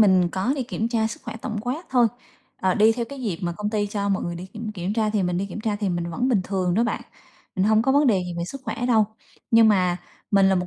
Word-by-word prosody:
mình 185 -4 +5
có 190 +8 0
đi 265 - -1
kiểm 230 -2 -2
tra 225 -2 +1
sức 225 - -6
khỏe 225 -3 -6
tổng 220 -4 -3
quát 265 +9 -4
thôi, 245 -2 +5 0.5
ờ, 185 -1 +1
đi 220 +2 +5
theo 235 0 -2
cái 280 -1 -8
dịp 195 -8 -2
mà 175 - -1
công 210 +4 -3
ty 210 -2 0
cho 200 0 -2
mọi 195 -1 0
người 175 0 -3
đi 180 +2 -7
kiểm 220 +2 -6
kiểm 190 0 -3
tra, 215 -1 +1
thì 210 -2 +1
mình 180 0 0
đi 200 - -1
kiểm 205 +2 -7
tra 215 -2 -1
thì 205 -2 -1
mình 170 -1 -2
vẫn 245 +10 0
bình 220 -7 +3
thường 185 -3 0
đó 230 +3 +3
bạn, 235 - -1 0.6
mình 185 - +2
hông 220 +1 +4
có 265 +1 +2
vấn 290 0 +4
đề 195 -6 +3
gì 175 - -5
về 170 - -1
sức 275 +6 -7
khỏe 245 - -2
đâu. 225 -4 +4 0.5
Nhưng 225 -1 +7
mà 180 -4 +3 0.3
mình 195 -1 +5
là 190 - +4
một 180 0 0
210 Hz, 295 wpm, -24 LUFS, 185-230 Hz, 0.6 s, Nhưng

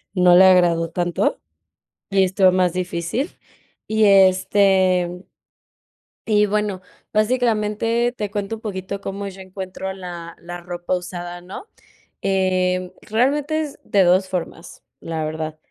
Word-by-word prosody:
no 180 -1 +6
le 190 +2 +8
agradó 175 -3 +4
tanto 175 +1 -1 0.7
y 195 -1 +4
estuvo 185 0 +3
más 180 -1 +2
difícil. 180 - -2 0.6
Y, 220 0 +2
este, 190 -2 +3 1.0
y 210 -1 +3
bueno, 205 -2 -1 0.3
básicamente 230 +1 +1
te 210 -2 -3
cuento 205 +1 -3
un 220 - -14
poquito 200 -2 -5
cómo 200 +1 -5
yo 195 0 -9
encuentro 190 0 -6
la 175 -3 -8
la 175 +1 -8
ropa 175 +1 -3
usada, 175 0 -6
¿no?, 185 - -9 0.6
eh, 185 -1 0
realmente 285 +7 0
es 300 -3 -5
de 200 - +3
2 185 +1 +3
formas, 175 -1 -6 0.2
la 160 -1 -4
verdad. 155 0 -4
190 Hz, 125 wpm, -21 LUFS, 175-210 Hz, 1.0 s, le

